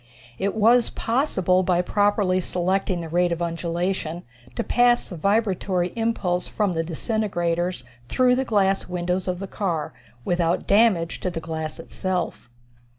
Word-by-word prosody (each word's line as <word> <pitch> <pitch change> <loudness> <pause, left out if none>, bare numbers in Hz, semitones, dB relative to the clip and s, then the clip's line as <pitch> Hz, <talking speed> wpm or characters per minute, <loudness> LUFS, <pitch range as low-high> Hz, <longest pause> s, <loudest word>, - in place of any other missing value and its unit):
It 200 +2 -1
was 230 +2 +4
possible 195 - +1
by 180 -1 +1
properly 205 -1 +2
selecting 185 0 -1
the 165 - -6
rate 175 +1 +2
of 170 - -1
undulation, 170 0 -2 0.3
to - - -1
pass 245 0 +3
the 180 - -8
vibratory 190 -1 +1
impulse 210 -6 -1
from 205 -4 0
the 165 -1 -1
disintegrators 175 - -1 0.3
through 250 - +3
the 265 - 0
glass 195 -5 +1
windows 180 +1 -2
of 180 +1 -2
a - - -4
car, 170 -7 -2 0.3
without 175 0 +1
damage 200 -6 +3
to 185 - -2
the 175 - -4
glass 160 -1 -5
itself. 185 -9 -3
185 Hz, 145 wpm, -24 LUFS, 175-205 Hz, 0.3 s, was